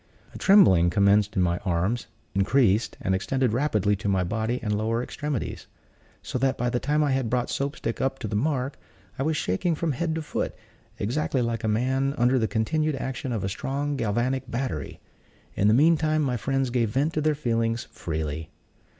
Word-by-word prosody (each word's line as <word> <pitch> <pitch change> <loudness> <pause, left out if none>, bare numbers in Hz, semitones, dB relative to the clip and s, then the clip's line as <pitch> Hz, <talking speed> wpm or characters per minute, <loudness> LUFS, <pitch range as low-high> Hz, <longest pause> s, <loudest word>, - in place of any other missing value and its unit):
A - - -8
trembling 125 - +6
commenced 100 +2 +3
in 95 - +3
my 85 0 +1
arms; 95 +5 -1 0.3
increased, 105 +2 +2
and 95 - 0
extended 125 +5 0
rapidly 105 -6 +1
to 100 +2 -3
my 95 -2 +2
body 110 +6 -1
and 105 -2 0
lower 115 +3 0
extremities; 145 -2 -4 0.6
so 125 - -3
that, 135 0 +1
by 120 0 0
the 120 - 0
time 150 +3 +1
that - - +3
I 140 - +1
had 130 -3 0
brought 125 +1 0
Soap 140 +1 -2
stick 115 - -4
up 135 0 0
to 115 - -5
the 105 - -3
mark, 135 +2 -1 0.4
I - - 0
was 155 +2 0
shaking 155 - 0
from 165 0 -1
head 160 +4 -1
to 160 - -3
foot, - - -3 0.4
exactly 130 +3 0
like 115 -1 -2
a - - 0
man 130 +5 +1
under 125 +2 +3
the 110 - +1
continued 155 +8 0
action 130 -1 -4
of 110 -5 -2
a - - 0
strong 140 +8 -2
galvanic 120 +2 -1
battery. 120 - -3 0.5
In 100 - +2
the 105 - +5
meantime 155 +1 +3
my 130 -3 0
friends 135 +2 -1
gave 120 -3 +1
vent 140 +8 0
to 155 - 0
their 155 0 +2
feelings 115 -4 0
freely. 80 -1 -4
120 Hz, 195 wpm, -26 LUFS, 105-140 Hz, 0.6 s, trembling